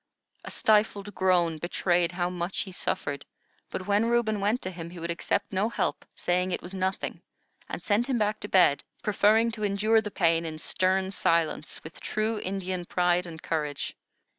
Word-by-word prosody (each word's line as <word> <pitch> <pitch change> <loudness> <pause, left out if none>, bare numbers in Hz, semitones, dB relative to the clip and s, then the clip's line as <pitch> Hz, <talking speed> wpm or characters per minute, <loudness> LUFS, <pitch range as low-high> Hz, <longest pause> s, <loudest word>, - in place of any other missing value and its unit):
A - - -7
stifled 210 -1 +2
groan 175 -4 +2
betrayed 175 +1 +1
how 175 0 -1
much 180 +1 -2
he 190 - -4
suffered; 145 -5 -3 0.5
but 185 - -5
when 205 +3 +2
Reuben 235 -3 +2
went 210 +5 +1
to 185 - -3
him, 170 -2 -7
he 175 - -11
would 170 0 -3
accept 185 +4 -1
no 200 +4 +1
help, - - -2
said 180 +1 0
it - - -1
was 180 - -8
nothing, 190 0 -2 0.5
and - - -5
sent 220 +4 +2
him 260 -3 +1
back 210 -1 0
to - - -5
bed, 180 -8 +4 0.2
preferring 215 +2 +4
to 215 -1 -5
endure 210 +2 +3
the 210 - -5
pain 165 -4 +2
in 160 -1 -5
stern 190 +3 +1
silence, 165 -4 0
with 160 - -10
true 215 +1 -1
Indian 185 -2 -3
pride 180 0 +1
and 160 -1 -9
courage. 150 -3 -2
185 Hz, 180 wpm, -28 LUFS, 175-210 Hz, 0.5 s, bed